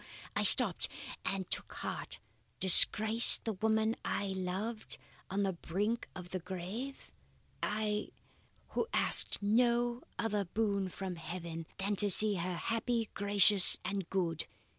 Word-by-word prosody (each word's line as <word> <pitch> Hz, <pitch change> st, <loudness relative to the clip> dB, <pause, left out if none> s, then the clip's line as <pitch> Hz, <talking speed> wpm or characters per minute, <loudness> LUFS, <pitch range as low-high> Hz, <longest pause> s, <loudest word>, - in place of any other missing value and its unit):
I -, -, 0 dB
stopped -, -, +4 dB, 0.3 s
and 195 Hz, -2 st, -3 dB
took -, -, -2 dB
heart. -, -, -6 dB, 0.4 s
Disgrace 215 Hz, +4 st, +7 dB
the 225 Hz, -, -5 dB
woman 220 Hz, +3 st, -1 dB
I 200 Hz, -, -3 dB
loved, 190 Hz, +4 st, -5 dB, 0.3 s
on 200 Hz, +2 st, -2 dB
the 195 Hz, -1 st, -1 dB
brink 205 Hz, +7 st, -4 dB
of 180 Hz, -1 st, -10 dB
the 185 Hz, -, -4 dB
grave? 190 Hz, +10 st, -8 dB, 0.5 s
I, 210 Hz, 0 st, -3 dB, 0.6 s
who -, -, -3 dB
asked -, -, +2 dB
no 240 Hz, +3 st, +1 dB, 0.2 s
other 210 Hz, -3 st, -2 dB
boon 200 Hz, 0 st, -2 dB
from 185 Hz, -1 st, -7 dB
heaven 165 Hz, -1 st, -8 dB
than 200 Hz, +1 st, -3 dB
to 205 Hz, +2 st, +1 dB
see 205 Hz, +1 st, +2 dB
her 180 Hz, +1 st, -4 dB
happy, 230 Hz, +3 st, -3 dB
gracious, 200 Hz, -1 st, +5 dB
and 195 Hz, -2 st, -4 dB
good? 170 Hz, -4 st, -2 dB
200 Hz, 130 wpm, -32 LUFS, 185-220 Hz, 0.6 s, Disgrace